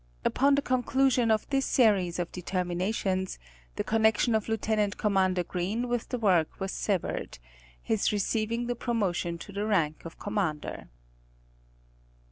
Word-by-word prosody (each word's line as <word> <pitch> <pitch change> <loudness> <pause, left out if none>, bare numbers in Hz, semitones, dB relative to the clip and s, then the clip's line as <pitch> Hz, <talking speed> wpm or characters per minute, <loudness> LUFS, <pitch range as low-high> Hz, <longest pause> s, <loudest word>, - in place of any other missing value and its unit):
Upon 280 +2 +3
the 280 - 0
con 255 -2 +1
clusion 260 -2 +2
of 215 -1 +2
this 270 -1 +1
series 200 -8 +3
of 175 -1 -3
determinations, 185 +1 -2 0.4
the - - -1
connection 220 +1 +2
of 220 0 0
Lieut. 215 -2 0
Commander 190 -3 +2
Green 195 +8 -2
with 240 -1 -2
the 250 - -2
work 185 -8 +2
was 195 -1 -2
severed, 195 -5 -2 0.5
he - - +1
Sees 205 -1 0
his 230 +2 -1
promotion 185 -7 -1
to 165 +5 -10
the 200 +1 -3
rank 165 -8 +1
of 165 - -9
Commander. 195 -8 -3
205 Hz, 140 wpm, -28 LUFS, 185-230 Hz, 0.5 s, Upon